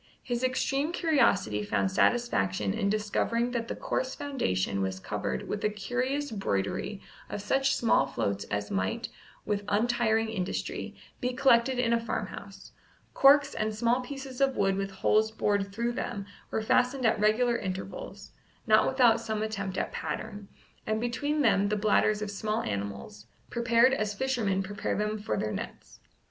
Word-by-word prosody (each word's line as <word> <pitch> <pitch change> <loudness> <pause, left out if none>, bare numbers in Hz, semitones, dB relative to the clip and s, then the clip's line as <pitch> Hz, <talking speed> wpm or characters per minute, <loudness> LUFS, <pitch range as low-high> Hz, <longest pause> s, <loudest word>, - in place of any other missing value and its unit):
His 245 0 -2
extreme 270 +4 0
curiosity 235 - +2
found 100 -2 0
satisfaction 200 - +1
in 210 -2 0
discovering 215 +3 0
that 235 -2 -2
the - - -4
coarse 260 0 -2
foundation 100 - -1
was 95 0 -2
covered 65 -8 -3
with 205 - -3
a 210 - +3
curious 255 +7 -2
broidery 195 - -2 0.3
of - - -4
such 270 +3 +2
small 230 - +3
floats 100 0 -2
as 105 0 -3
might, 95 0 -1 0.4
with 205 -1 -1
untiring 225 +1 +2
industry, 190 -4 -3 0.2
be 250 0 -1
collected 255 -1 +4
in 235 -2 +2
a 235 - +3
farmhouse: 230 - -6 0.4
corks 280 0 +6
and 215 0 -2
small 240 +3 +2
pieces 265 0 -7
of 270 -1 +2
wood 195 -1 +2
with 195 0 -2
holes 215 +3 +2
bored 205 -2 0
through 235 +4 -1
them 200 -4 -4 0.2
were 220 - -2
fastened 250 +3 +2
at 220 - +3
regular 230 +3 +3
intervals, 190 +1 -6 0.3
not 215 -1 +5
without 240 -4 +4
some 220 -1 -2
attempt 195 -3 -3
at - - -1
pattern, 205 -1 -5 0.4
and 215 0 0
between 290 +6 -1
them 200 -4 +3
the 210 - 0
bladders 210 0 +2
of 210 - -4
smaller 215 +2 -2
animals, 100 +1 -5 0.2
prepared 235 +2 +4
as 215 -5 -1
fishermen 220 -7 0
prepare 205 +1 -3
them 210 +1 -1
for 215 +2 -2
their 105 - -1
nets. - - -7
220 Hz, 155 wpm, -29 LUFS, 195-245 Hz, 0.4 s, corks